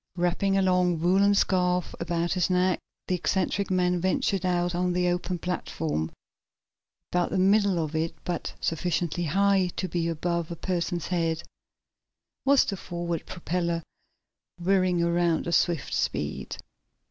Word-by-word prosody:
Wrapping 180 +2 +1
a 195 - +3
long, 180 -2 +2
woolen 195 +4 +4
scarf 180 -2 +1
about 170 0 -1
his 180 -1 +1
neck, 180 0 +2 0.3
the - - 0
eccentric 190 +2 0
man 180 -1 +1
ventured 185 0 +1
out 175 0 +1
on 180 0 0
the 180 0 +1
open 175 0 -1
platform. 160 - -2 1.0
About 175 0 +1
the - - -1
middle 200 0 +4
of 160 -1 -2
it, 160 +1 -1
but 175 -2 -3
sufficiently 170 +1 -1
high 195 +3 +3
to 185 - -2
be 170 -1 -1
above 170 0 -1
a 170 - -4
person's 175 -1 -2
head, 165 -3 0 1.0
was 280 0 +5
the 195 - -3
forward 170 -2 -4
propeller, 170 -2 -2 0.8
whirring 185 -1 +2
around 170 -1 +1
at 170 - -1
swift 170 -5 +1
speed. - - -2
175 Hz, 140 wpm, -27 LUFS, 170-185 Hz, 1.0 s, was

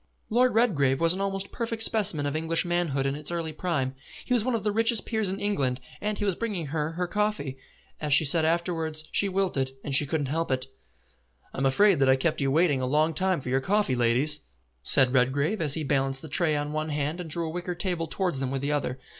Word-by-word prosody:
Lord 245 +1 +3
Redgrave 145 - +2
was 165 0 +2
an 190 - -4
almost 195 0 -2
perfect 230 -1 -2
specimen 205 -10 +2
of 145 +1 -2
English 165 +2 +1
manhood 170 -6 -1
in 135 - 0
its 150 +1 -4
early 165 -2 -3
prime. 145 -6 -2 0.3
He 250 - -1
was 235 -4 +2
one 255 0 0
of 220 - -3
the 210 - 0
richest 225 +1 +1
peers 220 -4 -1
in 195 +1 -4
England, 135 -12 -1 0.2
and 210 0 -2
he 205 - -2
was 195 - +2
bringing 200 -4 -4
her 155 0 -2
her 180 +2 -2
coffee. 180 -9 -2 0.4
As 150 -1 -3
she 145 +3 +6
said 160 +3 +5
afterwards, 160 -1 -1
she 200 - +2
wilted, 180 -9 -1
and 140 - -4
she 145 +1 +4
couldn't 155 -1 -1
help 165 +5 -2
it. 130 -1 -1 0.9
"I'm 135 0 0
afraid 180 +3 +3
I 135 - +4
have 130 0 +4
kept 155 +1 0
you 135 - +1
waiting 150 -2 +2
a 130 - -1
long 155 +4 +1
time 185 0 0
for 125 - -6
your 135 +1 +1
coffee, 205 -2 +1
ladies," 125 +5 +3 0.4
said 130 - +5
Redgrave, 140 - +1
as 150 -3 +5
he 160 - -3
balanced 135 -1 0
the 160 - -8
tray 155 +1 +2
on 145 0 -3
one 155 +1 -2
hand 150 +3 -2
and 165 - -8
drew 165 +2 -2
a 160 - -4
wicker 175 +1 -4
table 175 -2 -2
towards 175 -4 -1
them 135 -1 -2
with 135 0 -3
the 145 - -1
other. 140 -3 -2
160 Hz, 235 wpm, -26 LUFS, 140-190 Hz, 0.9 s, she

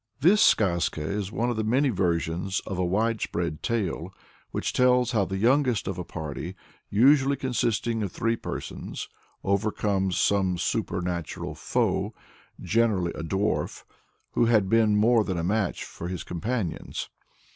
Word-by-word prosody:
This 185 +9 +5
Skazka 85 -6 +3
is 100 +4 -3
one 120 +2 0
of 120 - -3
the 110 - 0
many 130 +6 +2
versions 90 -2 0
of 95 -3 -4
a - - +2
widespread 90 -4 -1
tale, 95 -6 -2 0.4
which - - -2
tells 125 -1 +4
how 105 -5 +2
the 95 +2 -3
youngest 125 -1 +2
of 95 -2 -3
a - - -2
party, 80 +2 -6 0.3
usually 135 +5 +5
consisting 120 -3 0
of 100 -4 -2
three 115 +1 0
persons, - - -6 0.4
overcomes 100 -1 0
some 95 -3 +2
supernatural 85 -1 -2
foe, - - -1 0.4
generally 105 -7 +1
a - - -6
dwarf, 95 +6 -1 0.5
who 120 - +2
had 110 -5 +3
been 110 -1 +4
more 110 +2 +4
than 95 -4 -2
a 85 - -1
match 100 +1 0
for 85 - -7
his 90 -1 -4
companions. 95 0 -3
100 Hz, 145 wpm, -26 LUFS, 90-115 Hz, 0.5 s, This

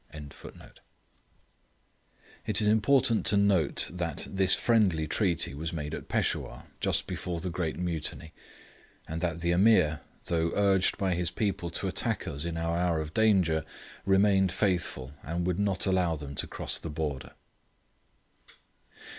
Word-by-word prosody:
] - - -30 2.4
It - - +3
is 105 - +2
important 115 +2 +3
to 100 - +4
note 100 -7 +3
that 85 -5 -4
this 95 -1 +4
friendly 95 -10 +2
treaty 85 -5 0
was 80 +3 -4
made 75 -3 -5
at - - -6
Peshawur, - - -1 0.2
just - - 0
before 85 -2 -4
the 90 +1 -4
great 80 -2 -3
Mutiny, 85 -2 -3 0.7
and 80 +1 -5
that 85 -2 -2
the 85 0 +1
Ameer, 85 -5 +4 0.3
though 85 -1 0
urged 100 -2 +3
by 95 -2 0
his 85 0 0
people 90 -2 -2
to 85 - -3
attack - - -2
us 70 +3 -4
in 85 -1 -3
our 85 0 -1
hour 85 -2 +1
of 80 0 -5
danger, 95 -8 +3 0.4
remained 95 -1 +3
faithful, 90 -10 -1
and 85 +3 -3
would 90 +1 -1
not 100 -2 +1
allow 90 -4 +1
them 70 -2 -8
to - - -3
cross - - -3
the 85 - -6
border. 75 -3 -4
85 Hz, 145 wpm, -28 LUFS, 80-95 Hz, 2.4 s, to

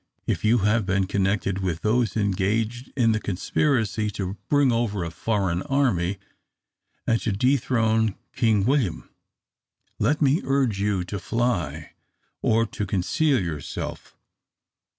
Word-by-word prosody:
If - - -1
you 110 +3 +4
have 110 +1 +3
been 95 -1 +2
connected 95 0 0
with 90 -3 -2
those 115 +1 +1
engaged 110 +5 -1
in 115 -3 +4
the 110 - +1
conspiracy 110 +2 0
to 100 -2 -4
bring 145 -3 +4
over 115 -5 0
a 85 - -4
foreign 95 -2 -1
army, 100 -10 +1 0.9
and 115 -1 +1
to 115 - -1
dethrone 110 -2 +2 0.2
King 110 -4 +2
William, 130 - 0 0.9
let 145 +9 +2
me 145 +3 +3
urge 130 -7 +1
you 100 -2 0
to 95 +3 -5
fly 115 -4 -2 0.5
or 115 +1 +3
to 105 -1 -4
conceal 130 - +1
yourself. 80 -6 -5
110 Hz, 130 wpm, -24 LUFS, 95-120 Hz, 0.9 s, you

